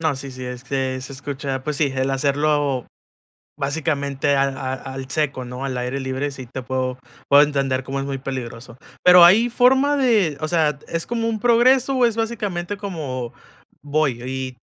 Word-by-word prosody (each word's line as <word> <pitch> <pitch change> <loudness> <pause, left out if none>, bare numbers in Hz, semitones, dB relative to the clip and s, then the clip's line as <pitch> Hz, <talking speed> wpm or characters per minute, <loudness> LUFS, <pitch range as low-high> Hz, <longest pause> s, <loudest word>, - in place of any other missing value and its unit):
No, 160 -4 0
sí, 135 +1 -7
sí, 130 0 -9
es 125 0 -7
que 130 -1 -2
se 135 - -8
escucha 135 -1 -4
pues 150 +1 -3
sí, 140 -3 +1
el 130 +1 0
hacerlo 140 -1 +1 0.7
básicamente 140 -1 -1
a 135 - +3 0.3
al 130 - -10
al 135 0 -7
seco, 140 -4 -1
¿no?, 125 +2 -6
al 130 -2 -3
aire 125 +2 -3
libre, 130 +2 -2
sí, 135 -2 -8
te 130 +2 -6
puedo 130 0 -2 0.3
puedo 140 +1 +7
entender 135 -3 0
como 135 +2 -4
es 135 - -2
muy 140 -1 -3
peligroso. 125 -3 -7 0.3
Pero, 180 -1 +9
¿hay 210 +7 +6
forma 265 +4 +3
de, 220 - +2
o 155 - -1
sea, 155 -4 +1
es 165 0 -3
como 230 -1 -2
un 220 -2 -2
progreso, 245 +3 +4
o 255 - +3
es 230 -2 +2
básicamente 205 -5 -3
como 150 - -5 0.5
voy, 145 -4 0
y 130 0 -5
140 Hz, 185 wpm, -21 LUFS, 130-175 Hz, 0.7 s, Pero